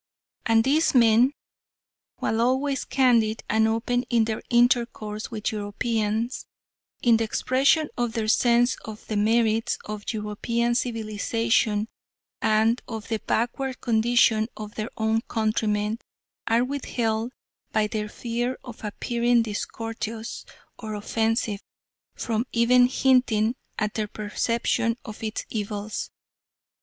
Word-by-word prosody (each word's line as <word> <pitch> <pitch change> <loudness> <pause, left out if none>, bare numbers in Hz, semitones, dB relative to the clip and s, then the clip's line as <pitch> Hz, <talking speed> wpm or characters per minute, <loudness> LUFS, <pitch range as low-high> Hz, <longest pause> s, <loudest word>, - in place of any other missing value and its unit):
And 225 -1 +4
these 290 +4 +2
men, 235 +2 +5 0.9
while 225 +1 0
always 265 +3 +1
candid 235 -5 +2
and 220 0 +3
open 230 +2 0
in 230 -2 +3
their 220 -1 -3
intercourse 235 -3 +1
with 220 -2 -3
Europeans 220 +2 -2 0.6
in 235 -2 +5
the 225 - 0
expression 270 +7 +2
of 240 -2 -1
their 225 -2 -1
sense 240 +2 +3
of 220 -1 -9
the 215 - -4
merits 225 +1 +2
of 210 -1 -6
European 230 +2 -1
civilisation, 225 -2 0 0.5
and 220 +2 +3
of 220 -3 -6
the 220 -2 -1
backward 250 +4 -1
condition 225 -1 +3
of 210 -1 -7
their 215 +1 -4
own 220 0 +1
countrymen, 215 -1 0 0.5
are 230 +2 +3
withheld, 240 -4 -2 0.4
by 215 -1 +2
their 210 0 -3
fear 240 +3 -3
of 245 -4 -11
appearing 235 +3 +1
discourteous 225 +1 -5 0.3
or 215 -2 -5
offensive, 220 0 -1 0.5
from 230 +1 -2
even 245 +1 +5
hinting 250 -4 +3 0.2
at 215 -1 -1
their 215 -1 -2
perception 230 +2 -1
of 215 -3 -9
its 220 -1 -3
evils. 210 -1 -4
225 Hz, 120 wpm, -25 LUFS, 215-240 Hz, 0.9 s, men